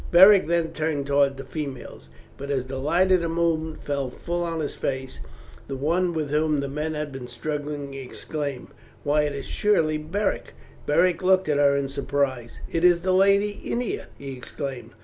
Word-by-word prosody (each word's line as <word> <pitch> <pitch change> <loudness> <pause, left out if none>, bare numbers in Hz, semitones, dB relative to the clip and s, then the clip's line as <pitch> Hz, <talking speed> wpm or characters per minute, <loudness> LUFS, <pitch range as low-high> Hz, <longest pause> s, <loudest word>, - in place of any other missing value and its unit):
Beric 190 +1 +8
then 170 -1 +1
turned 155 -3 -1
towards 140 -1 +3
the 135 - -7
females, 135 - -7 0.3
and 140 +1 -6
as 135 -3 0
the 130 0 -5
light 170 +7 +2
of 185 -2 +5
the 170 - -1
moon 165 -1 0
fell 140 -2 -3
full 175 +7 -4
on 165 -1 -2
his 150 - -2
face 130 -1 -4 0.5
the 135 - -4
one 170 +6 +1
with 155 -4 -3
whom 150 0 +2
the 140 - -2
men 150 +3 -3
had 150 -1 -3
been 130 -2 -7
struggling 145 -1 -4
exclaimed, 135 +1 -5 0.3
"Why, 150 +1 +2
it 145 -1 -2
is 140 - -5
surely 165 -8 +1
Beric!" 190 +7 -2 0.3
Beric 170 +4 +3
looked 190 -1 +3
at 150 - +2
her 140 -1 +5
in 140 -1 0
surprise. 135 -3 -2
"It 165 - -2
is 175 -1 +5
the 185 +1 +1
lady 200 +2 +3
Ennia!" 240 -1 -2
he 135 -1 -7
exclaimed. 130 0 -6
150 Hz, 185 wpm, -25 LUFS, 140-170 Hz, 0.5 s, Beric